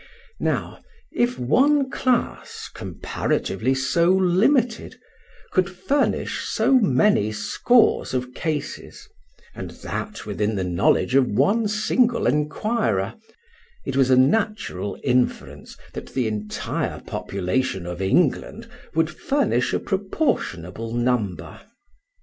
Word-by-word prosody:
Now, - - -2 0.3
if 240 +1 0
one 270 - +3
class, 250 -2 -1
comparatively 120 +7 -2
so 170 +6 +2
limited, 205 +7 +2 0.5
could 185 -1 +2
furnish 190 +11 -1
so - - 0
many 170 - +3
scores 175 - +2
of 125 0 -3
cases 155 0 -5 0.5
(and - - -7 0.2
that - - -5
within 105 +1 -1
the 95 - -1
knowledge 90 +7 +1
of 135 -1 +4
one 200 - +2
single 230 +3 +1
inquirer), 145 - 0 0.7
it - - -3
was 135 -1 +3
a 130 - +5
natural 145 - +1
inference 120 - -1 0.2
that - - -9
the 130 -3 +1
entire 105 -1 -3
population 95 +1 -2
of 90 +1 -5
England 175 - +1 0.3
would 160 0 +2
furnish 155 - 0
a - - +1
proportionable 115 - -2
number. 120 -6 -1
135 Hz, 105 wpm, -23 LUFS, -, 0.7 s, a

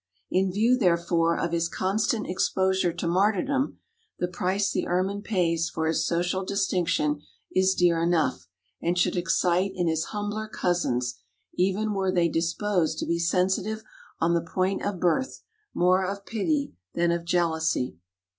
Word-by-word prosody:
In 190 0 +2
view, 230 +6 +3
therefore, 170 -3 +2
of 170 - -1
his 170 0 0
constant 210 +5 0
exposure 190 0 +1
to 175 0 -4
martyrdom 215 - +1 0.4
the 180 - -1
price 185 +2 0
the - - -1
Ermine 190 +3 0
pays 170 -6 0
for 160 - -2
his 160 0 +1
social 180 +2 0
distinction 180 -6 0 0.3
is 190 0 +3
dear 170 -2 +3
enough 160 - +1 0.3
and 175 +1 0
should 180 - +2
excite 180 +1 +1
in 175 -2 0
his 160 0 0
humbler 210 +1 -4
cousins, 125 - -1 0.3
even 200 +4 0
were 190 -1 0
they 175 -2 +2
disposed 165 0 0
to - - -2
be 170 0 0
sensitive 190 +5 0 0.4
on 170 +1 +2
the 170 - +2
point 185 +3 -1
of 200 -3 -2
birth, 260 +11 0 0.3
more 185 +2 +3
of 200 +1 -4
pity 280 +7 -1 0.2
than 170 0 +2
of 170 0 -1
jealousy. 160 - 0
180 Hz, 150 wpm, -26 LUFS, 170-195 Hz, 0.4 s, view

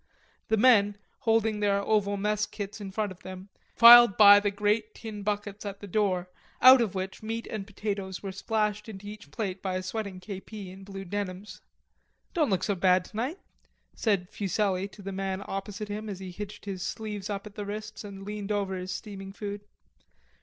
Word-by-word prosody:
The 220 - +2
men, 205 -4 +5 0.2
holding 225 -3 +2
their 200 -1 +2
oval 200 0 +1
mess 210 +1 0
kits 205 +1 -7
in 200 - -5
front 205 +1 -2
of 185 - -12
them, 185 +1 -9 0.3
filed 235 -3 +10
by 205 -1 +10
the 205 0 0
great 210 +2 0
tin 215 -2 -7
buckets 205 0 -3
at 200 -1 -6
the 205 - -8
door, 190 -3 0 0.3
out 255 0 +9
of 210 -5 -1
which 190 0 -4
meat 225 +1 -4
and 205 -3 -5
potatoes 200 -2 -4
were 195 - -4
splashed 210 +2 -1
into 205 -1 -9
each 210 0 -9
plate 195 -5 -4
by 190 -2 -2
a 185 - -2
sweating 200 -1 -4
K.P. 195 +1 -8
in 190 +1 -12
blue 195 0 -8
denims. 200 +1 -5 0.7
"Don't 315 -7 +2
look 190 -3 +1
so 205 - +1
bad 185 -1 +3
tonight," 250 - -3 0.6
said 195 -5 0
Fuselli 195 -1 0
to 200 0 -14
the 195 - -4
man 195 0 -3
opposite 205 +2 -5
him 210 +1 -4
as 195 - -5
he 190 -1 -7
hitched 205 +3 -8
his 195 -2 -5
sleeves 210 -1 -4
up 200 0 -4
at 210 - -10
the 205 - -5
wrists 215 +1 -6
and 195 -1 -9
leaned 210 0 -5
over 200 -2 -1
his 185 0 -5
steaming 195 -3 -7
food. 205 0 -6
205 Hz, 190 wpm, -28 LUFS, 195-215 Hz, 0.7 s, filed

